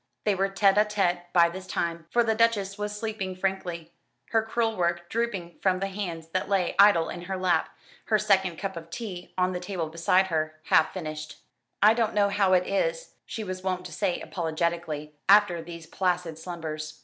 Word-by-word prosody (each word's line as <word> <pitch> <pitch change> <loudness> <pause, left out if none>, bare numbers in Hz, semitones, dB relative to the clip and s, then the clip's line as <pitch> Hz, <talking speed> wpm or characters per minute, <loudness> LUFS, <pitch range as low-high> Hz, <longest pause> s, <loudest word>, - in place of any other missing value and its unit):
They 210 - +2
were 195 +1 0
tête 195 0 +3
à 210 0 +4
tête 175 -4 0
by 170 -1 +6
this 185 +2 -8
time, 170 -1 -3
for 240 +5 +3
the 225 -1 +2
Duchess 215 -4 +2
was 210 0 -4
sleeping 210 -4 -4
frankly, 180 -3 -3 0.4
her 225 - +4
crewel 225 0 -1
work 175 -1 -1
drooping 200 -7 -3
from 185 -1 +2
the 195 +1 -2
hands 175 -5 -5
that 185 +3 -2
lay 190 -3 +1
idle 200 -5 +6
in 175 - -6
her 190 +1 -3
lap; 185 -1 +1 0.4
her 215 - +3
second 190 -4 +2
cup 195 0 -4
of 165 0 -8
tea 180 -2 -7
on 185 0 +2
the 180 - -3
table 180 -3 -4
beside 180 +4 +2
her, 155 -1 -2
half 155 - +4
finished. 155 -4 -6 0.4
"I 215 +1 +8
don't 225 -2 0
know 205 -1 +4
how 200 -2 +2
it 180 0 +4
is," - - -1
she 220 - -5
was 185 -2 -5
wont 185 -1 -2
to 180 - -8
say 185 +2 -1
apologetically, 165 -3 -3 0.2
after 200 -4 +6
these 170 0 -9
placid 175 -2 -1
slumbers. 155 -2 -6
185 Hz, 195 wpm, -27 LUFS, 170-205 Hz, 0.4 s, I